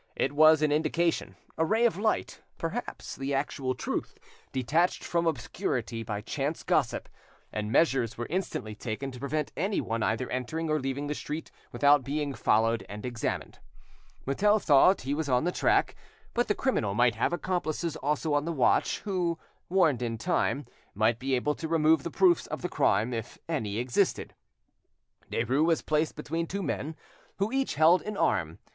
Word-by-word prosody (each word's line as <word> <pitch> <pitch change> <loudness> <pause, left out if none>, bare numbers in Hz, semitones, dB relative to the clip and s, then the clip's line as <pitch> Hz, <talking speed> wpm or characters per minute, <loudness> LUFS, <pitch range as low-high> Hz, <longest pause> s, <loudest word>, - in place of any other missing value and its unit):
It - - 0
was 155 +1 +6
an 150 - +3
indication, 160 +3 0 0.2
a - - +4
ray 220 +8 +2
of 230 - +3
light, 215 +3 -1 0.2
perhaps 195 +9 -5
the 135 +1 -2
actual 135 -2 -2
truth, - - -4 0.3
detached 155 +8 +1
from 170 -1 0
obscurity 120 -4 -2
by 105 -2 -4
chance 140 +7 -3
gossip; - - 0 0.5
and 105 0 -3
measures 125 -6 +2
were 120 - -3
instantly 170 - -3
taken 120 +5 -5
to 125 - -10
prevent 140 +2 -2
anyone 185 - -1
either 110 +3 0
entering 155 +6 -2
or 155 - +2
leaving 135 +1 -3
the 145 - -2
street 150 +2 -6 0.2
without 145 -1 +4
being 145 +1 -2
followed 115 -2 +2
and 105 +3 -7
examined. 120 -2 -3 0.7
Mutel 205 +10 +3
thought 175 +3 +5
he 135 +2 -2
was 150 -1 -2
on 125 +1 +3
the 175 - +1
track, - - +2 0.4
but 240 0 +1
the 210 - +1
criminal 110 - 0
might 120 0 +4
have 115 - 0
accomplices 175 -2 -2
also 150 +2 -1
on 145 +1 +1
the 170 - -1
watch, 135 -6 +2
who, 180 -4 -1 0.3
warned 165 -9 +3
in 115 -2 -2
time, 145 0 0 0.3
might 110 +3 +2
be 135 0 0
able 145 +4 0
to 160 - -5
remove 160 -1 +3
the 170 - -4
proofs 175 0 +3
of - - -5
the 180 - -1
crime, 110 +5 +2
if 115 0 -5
any 110 -11 -2
existed. 120 +1 0 1.0
Derues 125 +6 +1
was 165 -1 +2
placed 155 0 0
between 165 +2 -3
two 200 +3 -3
men 155 -1 -3 0.4
who 200 +3 0
each 270 0 0
held 165 +4 +5
an 210 -1 -5
arm. 80 0 +1
145 Hz, 170 wpm, -28 LUFS, 125-165 Hz, 1.0 s, was